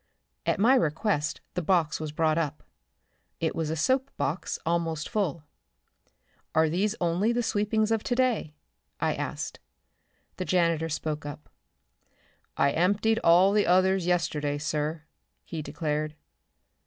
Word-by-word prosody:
At - - +1
my 235 +6 +5
request 155 - +1
the 180 - -1
box 165 -3 +1
was 155 -1 -4
brought 155 +1 +1
up. 150 -2 -3 0.8
It 160 - -1
was 160 -2 -1
a 160 - -1
soap 260 - +1
box 150 +6 -2
almost 165 -2 -1
full. 170 -7 -1 1.1
"Are 160 0 +4
these 195 +6 0
only 180 +6 +1
the 240 0 0
sweepings 215 +1 +1
of 225 -1 +2
today?" 245 -11 0 0.4
I - - +1
asked. - - -4 0.8
The 185 - -3
janitor 170 -3 +1
spoke 155 0 -3
up. 145 +1 -8 1.1
"I 140 +1 +3
emptied 205 +7 +2
all 180 +4 +6
the 210 -3 +3
others 185 0 +3
yesterday, 150 -5 0
sir," 150 +1 -2 0.4
he 165 -2 -5
declared. 150 0 -3
165 Hz, 130 wpm, -27 LUFS, 155-200 Hz, 1.1 s, all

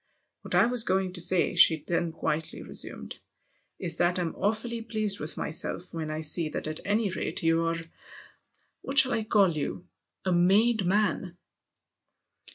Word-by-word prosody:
" - - -52
What - - -4
I - - +5
was 245 -1 +1
going 190 -2 -1
to 175 - +1
say," 180 0 +3
she 160 -2 +6
then 170 -1 -1
quietly 160 -1 -3
resumed, - - -3 0.3
" - - -43
is 165 -1 -3
that 175 +1 +1
I'm 175 -3 -2
awfully 225 +3 -2
pleased 215 -3 -1
with 155 - -4
myself 175 +3 -4
when 160 -2 -4
I 155 +1 -4
see 160 +1 0
that - - -5
at 155 0 -4
any 205 0 0
rate 190 +1 -4
you're 165 0 +1 1.0
what 275 - -6
shall 265 0 +8
I 225 - -1
call 205 -4 +3
you? 155 +3 -5 0.4
a 185 - 0
made 200 +4 +3
man." 185 -2 0
180 Hz, 165 wpm, -27 LUFS, 165-215 Hz, 1.0 s, shall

